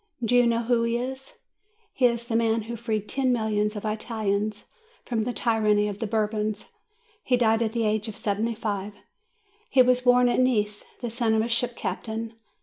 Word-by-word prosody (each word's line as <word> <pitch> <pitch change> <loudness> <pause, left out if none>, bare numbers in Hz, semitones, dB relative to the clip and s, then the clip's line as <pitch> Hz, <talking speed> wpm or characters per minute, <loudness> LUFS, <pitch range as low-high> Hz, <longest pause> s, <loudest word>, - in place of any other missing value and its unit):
Do 240 +2 +2
you 245 -1 +5
know 235 0 +1
who 235 0 +2
he 230 0 0
is? 265 +2 -6 0.6
He 250 - +4
is 235 0 -2
the 235 -2 -3
man 225 -1 +2
who 235 +2 -6
freed 220 -2 -3
ten 265 -2 0
millions 215 -2 0
of 210 - -6
Italians 215 -1 -2 0.4
from 225 -3 -1
the 245 - -1
tyranny 215 -3 +2
of 205 -1 -5
the 225 - -2
Bourbons. 215 -1 -1 0.6
He 250 - +2
died 225 -1 +3
at 220 -1 0
the 230 -2 0
age 215 +1 0
of 220 - -6
seventy 220 +3 -1
five. 205 -2 -4 0.7
He 255 - +6
was 250 0 +3
born 250 0 +5
at 245 - +1
Nice, 210 -5 +1 0.2
the 240 -2 -3
son 230 -1 +1
of 220 - +2
a - - -2
ship 240 +1 0
captain. 225 0 -4
225 Hz, 195 wpm, -26 LUFS, 215-240 Hz, 0.7 s, He